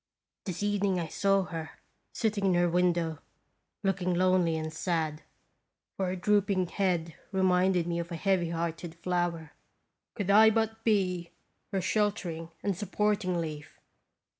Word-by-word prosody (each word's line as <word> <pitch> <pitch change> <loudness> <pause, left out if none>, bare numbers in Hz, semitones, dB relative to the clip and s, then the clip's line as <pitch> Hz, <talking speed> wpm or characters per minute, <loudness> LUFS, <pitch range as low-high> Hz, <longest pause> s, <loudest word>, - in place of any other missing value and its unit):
This 185 0 -4
evening 200 -2 +1
I 170 - -2
saw 195 +2 +2
her 165 -3 -7 0.3
sitting 210 -3 0
in 185 - +3
her 175 0 +3
window, 170 -2 +1 0.6
look 195 -1 0
ing 180 0 +1
lonely 180 -2 +3
and 155 0 -4
sad, 160 -2 -1 0.7
for 190 - -1
her 180 - -1
drooping 195 -1 +1
head 175 -5 0 0.2
reminded 185 -2 +3
me 170 0 -1
of 170 +1 -5
a - - -3
heavy 180 0 +1
hearted 165 0 -3
flower. 170 -2 -2 0.6
Could 200 -3 0
I 220 +2 +8
but 225 0 -1
be 180 -6 +1 0.4
her 195 -2 0
shelter 205 -1 0
ing 165 0 -7
and 200 -2 0
supporting 205 -1 0
leaf 155 -2 -6
180 Hz, 145 wpm, -29 LUFS, 170-195 Hz, 0.7 s, I